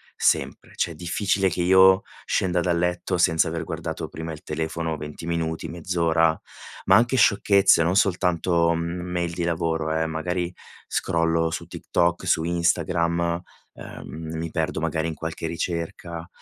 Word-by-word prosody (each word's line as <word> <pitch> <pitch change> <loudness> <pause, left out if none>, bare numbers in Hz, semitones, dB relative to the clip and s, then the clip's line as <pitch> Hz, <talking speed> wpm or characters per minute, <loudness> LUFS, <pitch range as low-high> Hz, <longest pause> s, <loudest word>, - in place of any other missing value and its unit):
sempre. - - 0
Cioè, 85 - 0
è - - -9
difficile 95 +4 0
che 90 - -2
io 95 +1 +6 0.2
scenda 90 -1 +1
dal 85 0 +1
letto 90 +1 -1
senza 85 -1 +3
aver 85 0 -3
guardato - - -5
prima 80 0 -6
il 75 - -11
telefono 80 +1 -3
20 75 +2 -8
minuti, 80 -1 -2
mezz'ora, 80 -1 +1 0.5
ma 95 - +6
anche 120 +5 +3
sciocchezze, 100 -5 +5
non 85 +3 +1
soltanto 90 -3 +2
mail 85 +1 -3
di 85 +1 -3
lavoro, 80 -2 -1
eh. 80 0 0
Magari 90 +2 -2 0.3
scrollo 80 0 +1
su - - -5
TikTok, 85 0 -1
su 80 - +2
Instagram, 85 0 0 0.3
uhm, 80 +1 -8
mi 80 0 -4
perdo - - -1
magari 80 0 -1
in 80 - -4
qualche 80 +1 -5
ricerca 85 0 -4
85 Hz, 145 wpm, -24 LUFS, 80-90 Hz, 0.5 s, io